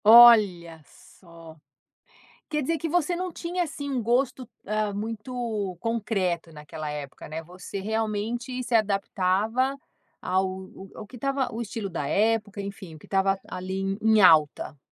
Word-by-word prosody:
Olha 210 -8 +7
só. 165 -3 -16 0.9
Quer 300 -1 -1
dizer 325 +4 0
que 330 - -3
você 350 +1 +1
não 365 +1 -3
tinha 350 +2 -2
assim 285 -3 -6
um 255 -4 -1
gosto, 250 +2 0 0.2
hã, 215 -1 0
muito 220 -2 -3
concreto 195 -7 -1
naquela 150 0 -6
época, 145 -2 -7
né. 160 +1 -5
Você 180 +3 -8
realmente 225 +4 -2
se 240 -1 0
adaptava 210 +4 +1 0.5
ao 190 0 -1 0.3
ao 210 - -8
que 250 - -12
estava 275 +2 -1
o 225 - -5
estilo 220 -2 -4
da 165 -5 -3
época, 210 +1 +1
enfim, 195 -4 -8
o - - -13
que - - -16
estava 195 0 +2
ali 185 +1 -5
em 195 0 -1
em 220 -1 +5
alta. 155 -5 +4
210 Hz, 150 wpm, -26 LUFS, 185-240 Hz, 0.9 s, Olha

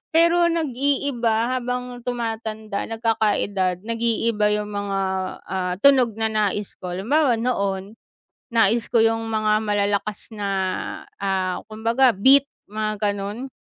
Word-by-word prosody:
Pero 340 +1 +5
nag-iiba 265 -6 0
habang 250 0 -4
tumatanda, 225 -3 -4
nagkaka-edad, 205 -5 0
nag-iiba 230 -2 +1
'yong 210 0 -1
mga, 200 -1 -2 0.5
ah, 180 -1 -1
tunog 260 -6 +5
na 220 - +2
nais 210 -1 -1
ko. 180 -1 -5
Halimbawa 255 +7 +2
noon, 200 -4 -2 0.6
nais 225 0 +3
ko 235 - +4
'yong 225 0 +1
mga 215 -1 +1
malalakas 205 +1 -1
na, 205 -1 -3 0.7
ah, 190 -2 -1
kumbaga 230 +4 +3
beat, 270 +8 +6 0.2
mga 215 -1 -2
ganon. 205 +6 -5
220 Hz, 115 wpm, -22 LUFS, 205-245 Hz, 0.7 s, beat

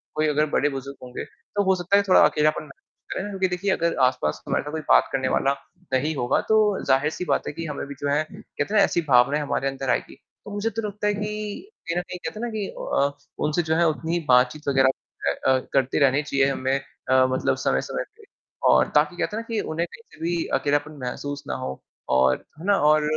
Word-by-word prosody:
कोई 155 0 +2
अगर 150 0 +2
बड़े-बुज़ुर्ग 140 -2 -1
होंगे, 125 0 -6
तो 205 - -4
हो 190 -1 +3
सकता 180 +2 +2
है 200 - +3
थोड़ा 185 - +6
अकेलापन 150 +1 +2
महसूस 145 -3 -13
करें, 205 - -4
क्योंकि 190 -2 0
देखिए 180 +2 -1
अगर 170 -2 +1
आस-पास 75 -12 -2
हमारे - - 0
साथ 150 - -6
कोई 160 0 -3
बात - - +6
करने 130 -1 0
वाला 135 0 +2 0.4
नहीं 150 +4 +1
होगा, 120 -2 +1
तो 215 -2 +3
ज़ाहिर-सी 150 +6 +2
बात - - 0
है - - -3
कि 165 +2 -5
हमें 150 -2 -4
भी 140 - -8
जो 145 - 0
है 145 +2 +2
कहते - - -5
हैं - - +4
ना, - - +7
ऐसी 170 - +1
भावनाएँ 135 +4 +5
हमारे 140 -2 -1
अंदर 135 -1 -3
आएँगी। 120 - -1 0.3
तो 205 - -8
मुझे 205 +2 -1
तो 225 +2 -4
लगता 210 +1 -3
है 210 - +2
कि, 210 - -5 0.2
कहीं 170 +1 -1
न - - +2
कहीं 180 - -8
कहते 210 - -6
हैं - - -4
ना - - -3
कि 205 -2 -2
अ 140 - +1 0.4
उनसे 155 +3 +1
जो - - +4
है 170 +1 +4
उतनी 160 +1 -2
ही 175 - +1
बातचीत 125 +4 +3
वगैरह 135 -1 +4 0.4
अ 70 - -1
अ, 130 - +4
करते 135 -1 +2
रहने 140 0 +4
चाहिए 140 -2 +2
हमें 130 0 -1 0.4
अ, 130 0 +5
मतलब 130 - +1
समय-समय - - -1
पे। 450 - -17 0.5
और - - +5
ताकि - - +3
कहते 210 - -2
हैं - - -2
ना - - -20
कि 220 - +1
उन्हें 165 +2 -2
कहीं - - -12
पे - - -17
भी 170 -1 0
अकेलापन 145 +1 0
महसूस 145 +3 -5
ना - - -2
हो 65 0 -5 0.4
और 65 0 +3 0.2
है 165 - -8
ना 200 0 +4
और 155 0 +3
150 Hz, 235 wpm, -24 LUFS, 135-190 Hz, 0.5 s, ना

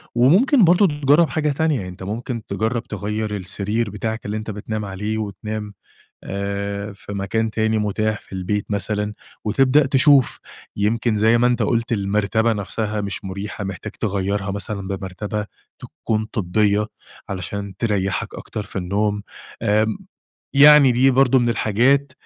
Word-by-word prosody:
وممكن 195 - +5
برضه 180 +3 +5
تجرَّب 145 +2 +3
حاجة 150 -1 0
تانية، 160 +2 +1
يعني 95 -5 -5
أنت 90 +1 -10
ممكن 115 +3 -4
تجرّب 110 +4 -1
تغيّر 105 +1 -3
السرير 100 +4 -2
بتاعك 110 +2 -4
اللي 105 +1 -2
أنت 110 0 -5
بتنام 105 +1 -4
عليه، 105 +3 -3
وتنام 105 0 -5 0.5
آآ، 100 +1 -4
في 100 - -10
مكان 110 +3 -1
تاني 110 0 +1
متاح 105 +1 -1
في - - -16
البيت 95 +2 -2
مثلًا، 105 +1 -2 0.3
وتبدأ 135 +6 +3
تشوف 140 -1 +4 0.4
يمكن 110 +2 +1
زي 110 +3 +4
ما 120 +1 +3
أنت 125 - +1
قُلت 115 0 0
المرتبة 105 +2 +1
نفسها 105 +1 -3
مش 100 0 -4
مريحة، 100 +2 -5
محتاج 95 -1 -6
تغيّرها 100 -1 -2
مثلًا 100 -1 -4
بمرتبة 100 +2 -4 0.3
تكون 110 -1 -3
طبية 105 +1 +1 0.4
علشان 100 +1 -5
تريّحك 100 -4 -1
أكتر 105 - -6
في 100 - -15
النوم، 100 +3 0 0.4
آمم، 110 - +2 0.6
يعني 140 -2 +8
دي 130 +3 +4
برضه 130 0 +4
من 120 -1 +1
الحاجات 130 +5 +2
105 Hz, 145 wpm, -21 LUFS, 100-120 Hz, 0.6 s, يعني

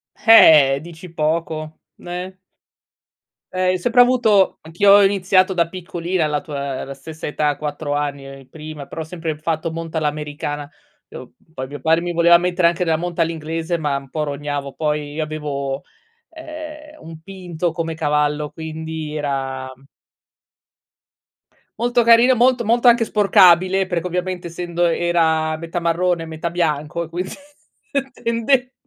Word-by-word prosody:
Eh, 150 - +7
dici 170 +2 -11
poco, 155 0 -2 0.2
n - - -15
eh? 180 +2 -6 1.2
Eh, 185 0 +2
io - - 0
sempre 245 +6 +3
avuto 235 -6 +3
anch'io 185 +5 +3
ho 205 0 +7
iniziato 190 -1 +3
da 170 -2 +1
piccolina 175 -1 -3
alla 150 -1 -1
tua 140 -3 -5
la 140 - -8
stessa 155 +3 -8
età 150 -1 0
4 145 0 -4
anni, 140 -2 -5
prima, 150 -1 -9
però 160 - -6
ho - - -3
sempre 160 -1 -5
fatto 160 +1 -2
monta 165 0 -4
all'americana, 150 -1 -4 0.4
ehm, - - -9
uhm, 160 - -19
poi 130 -3 -5
mio 145 +2 -8
padre 160 +5 +2
mi 175 0 -3
voleva 170 0 +5
mettere 180 0 +2
anche 170 +1 -2
della 165 -2 +1
monta 175 0 -3
all'inglese 165 +1 -2
ma 150 -3 -1
un 135 -1 -6
po' 155 +1 -2
rognavo, 145 -1 -4
poi 150 -2 -2
io 155 +1 -2
avevo, 145 -3 -4 0.5
ehm, 310 -1 -10
un 160 -1 -10
pinto 175 -2 -4
come 165 -1 -3
cavallo 150 -1 0
quindi 160 -1 -6
era 135 -3 -3
uhm 130 +1 -18 2.0
Molto 240 0 +2
carino, 235 +2 +6
molto 245 +1 +3
molto 235 +3 +3
anche 235 0 +6
sporcabile, 190 -3 +4
perché 175 -1 -2
ovviamente 180 0 -3
essendo 175 0 -2
era 160 -2 +1
metà 165 +2 -4
marrone, 170 0 0
metà 160 +1 -4
bianco 165 -1 -1
e 165 - -10
quin 175 +2 -3 0.9
tende 250 +2 0
165 Hz, 150 wpm, -20 LUFS, 150-185 Hz, 2.0 s, Eh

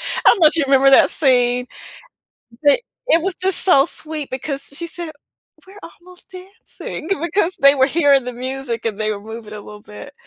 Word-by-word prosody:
I - - -1
don't 420 - +5
know 310 - +8
if - - -6
you 320 - +1
remember 270 0 +4
that 270 - +6
scene, 250 -3 +1 1.0
but 290 +7 +4 0.3
it 330 -6 +3
was 380 -1 -2
just 380 -1 +1
so 315 -6 +4
sweet, 310 -3 -6
because 275 +2 -4
she 340 +3 -4
said, 335 -2 -7 0.5
"We're 390 +2 -15
almost 360 +1 -15
dancing" 370 -3 -10
because 350 +1 -1
they 275 +1 +6
were 265 0 +3
hearing 285 -4 +2
the 250 - -6
music, 255 -2 -5
and 215 -2 -4
they 215 0 -1
were 200 - -7
moving 220 -2 -9
a 210 - -9
little 210 0 -12
bit, 210 +8 -12
280 Hz, 195 wpm, -18 LUFS, 250-340 Hz, 1.0 s, know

